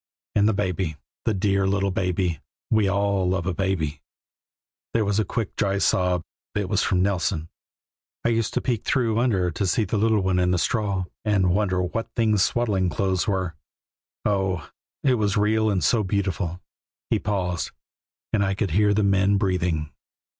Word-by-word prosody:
And 105 +1 +4
the - - +2
Baby, 90 -5 -1 0.3
the 110 - +2
dear 95 0 +1
little 100 0 +1
Baby 90 -3 -1 0.3
we 110 -3 +3
all 100 -2 +1
love 95 -2 0
a 90 - 0
baby." 85 -6 -1 0.9
There 110 -2 +3
was 100 +1 +1
a - - +3
quick, 110 +1 -3
dry 100 -1 +1
sob; 90 -3 +2 0.3
it 105 -2 0
was 100 +1 +1
from 90 -1 +2
Nelson. 90 -4 -1 0.8
"I - - +4
used 115 -2 0
to - - +1
peek 120 -5 -1
through 115 -4 +1
under 95 -8 +1
to 95 +4 -1
see 110 - +2
the 100 +3 -1
little 110 -1 +3
one 95 -1 +1
in 90 0 +2
the 90 - +2
straw, 100 +2 0 0.2
and 100 -4 +2
wonder 95 -2 +1
what 115 +6 -3
things 110 -3 +2
swaddling 100 -5 +1
clothes 95 +3 0
were. 95 -4 -1 0.7
Oh, 95 -5 0 0.3
it 130 -4 +3
was 105 -2 +1
so 105 - +2
real 110 +1 +2
and 95 -5 0
so 110 +7 +3
beautiful!" 95 -3 -1 0.5
He - - +3
paused, 90 -4 -1 0.6
and 105 -2 +3
I 95 0 0
could 100 -3 -1
hear 105 +3 +3
the 105 - +2
men 100 0 +3
breathing. 90 -6 0
100 Hz, 175 wpm, -24 LUFS, 90-105 Hz, 0.9 s, And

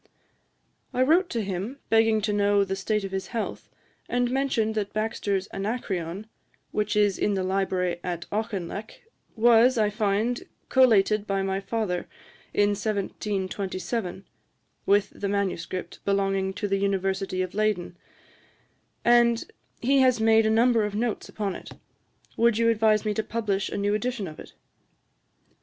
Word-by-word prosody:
I 255 - +4
wrote 340 +6 +3
to 230 -2 -2
him, 195 +7 -4
begging 225 -1 +4
to 210 0 0
know 205 0 +3
the 195 0 -2
state 210 +2 -1
of 195 - -5
his 190 0 -3
health, 230 -3 -4 0.4
and 245 0 +1
mentioned 255 -5 +1
that 210 -2 -3
Baxter's 210 -3 -1
Anacreon, 195 -3 -3 0.5
'which 210 0 -1
is 205 -2 +2
in 205 - +1
the 190 - -1
library 185 -2 0
at 175 -1 -4
Auchinleck, 210 -1 -4 0.3
was, 235 +2 +5
I 210 -1 +2
find, 215 +3 0 0.2
collated 215 -5 +4
by 195 -1 0
my 195 0 -1
father 195 -3 -2 0.4
in 205 0 +3
1727, 195 -1 -3 0.6
with 200 0 +3
the 200 - -4
MS. 200 -4 -1 0.4
belonging 195 -1 0
to 205 - -2
the 195 0 +1
University 195 -1 -1
of 185 - -6
Leyden, 210 -5 0 1.1
and 235 -1 +4 0.3
he 275 +3 +4
has 255 -3 +4
made 220 0 +4
a - - +3
number 230 0 +4
of 210 -1 -3
Notes 225 0 -2
upon 205 -3 -3
it. - - -9 0.6
Would 235 -1 +3
you 230 0 +3
advise 220 -1 +3
me 210 - +1
to 220 - 0
publish 215 -3 -2
a - - -4
new 205 0 +1
edition 215 -1 -2
of 155 - -10
it?' - - -11
210 Hz, 150 wpm, -26 LUFS, 195-225 Hz, 1.1 s, was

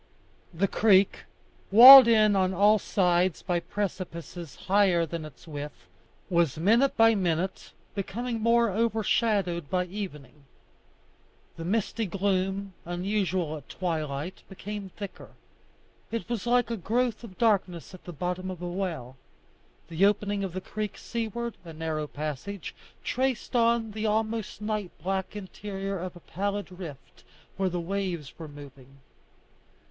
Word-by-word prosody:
The 185 +4 0
creek, 200 -1 +3 0.4
walled 255 +4 +12
in 215 -3 +5
on 190 -1 +1
all 210 +3 +5
sides 180 -3 +1
by 175 -2 0
precipices 170 -4 -5
higher 190 -3 +2
than 165 -1 -5
its 155 +3 -14
width, 145 - -7 0.4
was 170 -5 +1
minute 230 - +3
by 225 0 +6
minute 185 -2 -1 0.2
becoming 225 +4 -3
more 230 0 +3
overshadowed 210 -6 0
by 180 -1 0
evening. 150 - -8 1.1
The 165 - -7
misty 220 +3 -1
gloom, 195 +1 -1
usual 180 -3 -1
at 145 - -14
twilight, 155 -2 -3
became 200 +1 -7
thicker; 200 0 -9 0.8
it 230 -1 -4
was 235 -2 -3
like 245 0 +2
a 230 - -1
growth 235 +4 -1
of 195 -6 -11
darkness 190 -7 0
at 185 - -12
the 175 - -6
bottom 180 +4 -3
of 185 -2 -6
a 175 - -5
well. 170 -9 -4 0.7
The 170 +3 -1
opening 205 -1 0
of 190 -3 -4
the 185 - -4
creek 210 +2 -5
seaward, 235 0 -4
a 165 -2 -10
narrow 155 -1 -3
passage, 155 +6 -5 0.3
traced 255 -1 -1
on 230 -1 +2
the 215 +1 -2
almost 220 0 -1
night 210 -3 -2
black 190 +2 -2
interior 195 -1 -5
a 185 +2 -4
pallid 195 +3 -4
rift 145 -8 -10 0.3
where 190 0 +1
the 175 0 -3
waves 175 -5 -4
were 160 - -7
moving. 140 -2 -13
190 Hz, 135 wpm, -27 LUFS, 170-215 Hz, 1.1 s, walled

